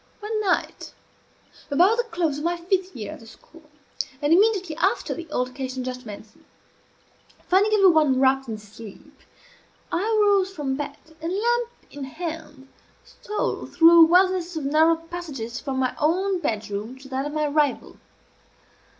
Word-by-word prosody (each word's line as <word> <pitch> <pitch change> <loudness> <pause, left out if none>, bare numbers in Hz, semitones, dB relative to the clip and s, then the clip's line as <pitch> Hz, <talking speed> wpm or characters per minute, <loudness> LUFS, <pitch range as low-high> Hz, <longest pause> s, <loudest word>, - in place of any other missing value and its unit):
One 430 0 -3
night, 385 -4 -2 0.7
about 360 +10 +4
the - - +3
close 335 -8 -2
of - - -7
my 345 +1 0
fifth 370 +2 -1
year 215 -4 -6
at - - -10
the 225 - -15
school, 305 +7 -18 0.5
and 295 +2 +2
immediately 380 -4 +2
after 385 +8 0
the 335 -2 -9
altercation 255 0 -3
just 250 -1 -6
mentioned, 210 +1 -11 1.0
finding 395 +4 +3
every 390 -3 +6
one 300 -5 +3
wrapped 270 0 +2
in 220 - -4
sleep, 210 0 -13 0.8
I - - 0
arose 410 -3 +3
from 290 -7 -3
bed, 290 +1 -5 0.2
and, 330 +2 -3
lamp 475 +4 0 0.2
in 285 -1 -7
hand, 295 -1 -7 0.4
stole 420 - -4
through 330 -1 +5
a - - +10
wilderness 360 0 +2
of 310 -3 -3
narrow 315 +3 +4
passages 325 -9 -7
from 270 -2 -4
my 255 -1 0
own 365 +5 +1
bedroom 215 -1 -4
to 270 +1 -13
that 265 +2 -2
of 295 - -7
my 305 0 0
rival. 295 -1 0
315 Hz, 155 wpm, -24 LUFS, 265-370 Hz, 1.0 s, a